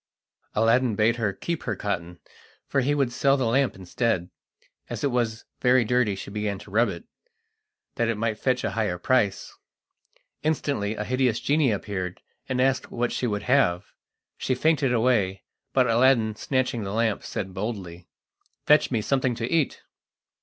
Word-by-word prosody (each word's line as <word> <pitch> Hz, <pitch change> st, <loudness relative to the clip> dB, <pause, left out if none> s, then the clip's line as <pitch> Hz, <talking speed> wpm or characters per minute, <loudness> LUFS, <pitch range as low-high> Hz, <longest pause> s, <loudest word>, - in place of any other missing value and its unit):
Aladdin 115 Hz, +1 st, +3 dB
bade 110 Hz, +3 st, +2 dB
her 110 Hz, -4 st, 0 dB
keep 170 Hz, -, -4 dB
her -, -, -2 dB
cotton, 90 Hz, -4 st, -4 dB, 0.5 s
for 135 Hz, -, +1 dB
he 145 Hz, +3 st, +1 dB
would 135 Hz, -4 st, +1 dB
sell 140 Hz, +2 st, +3 dB
the 130 Hz, -, 0 dB
lamp 130 Hz, +3 st, +2 dB
instead. 95 Hz, -1 st, -1 dB, 0.6 s
As -, -, -5 dB
it 140 Hz, -, +1 dB
was 115 Hz, -2 st, -1 dB
very 125 Hz, -1 st, +4 dB
dirty 125 Hz, -3 st, +2 dB
she 95 Hz, +1 st, -8 dB
began 105 Hz, -1 st, -2 dB
to 100 Hz, -, -13 dB
rub 115 Hz, +4 st, +3 dB
it, -, -, -7 dB, 0.9 s
that 115 Hz, -, +1 dB
it 115 Hz, -, 0 dB
might 110 Hz, -1 st, -1 dB
fetch 125 Hz, -1 st, 0 dB
a -, -, -1 dB
higher 105 Hz, -5 st, -1 dB
price. 105 Hz, 0 st, 0 dB, 0.9 s
Instantly 140 Hz, -9 st, -1 dB
a 105 Hz, -, -3 dB
hideous 125 Hz, 0 st, +1 dB
genie 145 Hz, -2 st, +2 dB
appeared, 95 Hz, -3 st, -3 dB, 0.3 s
and 130 Hz, -1 st, -1 dB
asked 130 Hz, 0 st, +1 dB
what 120 Hz, 0 st, -1 dB
she 125 Hz, -, -1 dB
would 105 Hz, -2 st, -2 dB
have. 125 Hz, -9 st, +2 dB, 0.5 s
She 130 Hz, -, 0 dB
fainted 145 Hz, -1 st, +2 dB
away, 110 Hz, -6 st, +1 dB, 0.3 s
but 130 Hz, -1 st, +3 dB
Aladdin, 115 Hz, -2 st, +3 dB
snatching 130 Hz, -1 st, -1 dB
the 100 Hz, 0 st, -4 dB
lamp, 110 Hz, -2 st, +1 dB
said 95 Hz, -1 st, -5 dB
boldly: 95 Hz, -4 st, -5 dB, 0.6 s
"Fetch 150 Hz, +1 st, +5 dB
me 115 Hz, -4 st, 0 dB
something 130 Hz, -1 st, +1 dB
to 115 Hz, 0 st, -3 dB
eat!" 160 Hz, -4 st, 0 dB
115 Hz, 165 wpm, -25 LUFS, 105-130 Hz, 0.9 s, Fetch